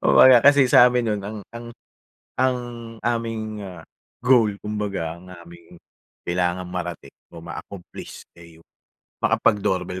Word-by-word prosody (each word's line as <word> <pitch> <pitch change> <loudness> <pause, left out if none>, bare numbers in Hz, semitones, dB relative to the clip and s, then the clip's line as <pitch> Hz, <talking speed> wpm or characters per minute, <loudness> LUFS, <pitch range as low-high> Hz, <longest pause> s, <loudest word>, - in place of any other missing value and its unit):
Kumbaga, 130 -2 +7
kasi 140 -2 +6
sa 125 - +8
amin 125 -1 +1
no'n, 100 - -4
ang 105 +1 -6 0.2
ang 120 0 -8 0.7
ang 130 -1 +2 0.5
aming, 115 -2 -3
ah, 90 -4 -10 0.4
goal, 120 -5 +4
kumbaga, 100 -6 -4
ang 90 +1 -16
aming, 85 -1 -14 0.5
kailangang 90 0 -1
marating 85 -5 -6 0.2
o 85 - -10
ma-accomplish, 90 +2 -10
eh, 85 -1 -15
yung, 80 - -23 0.6
makapag-doorbell 95 -3 0
100 Hz, 125 wpm, -22 LUFS, 85-115 Hz, 0.7 s, sa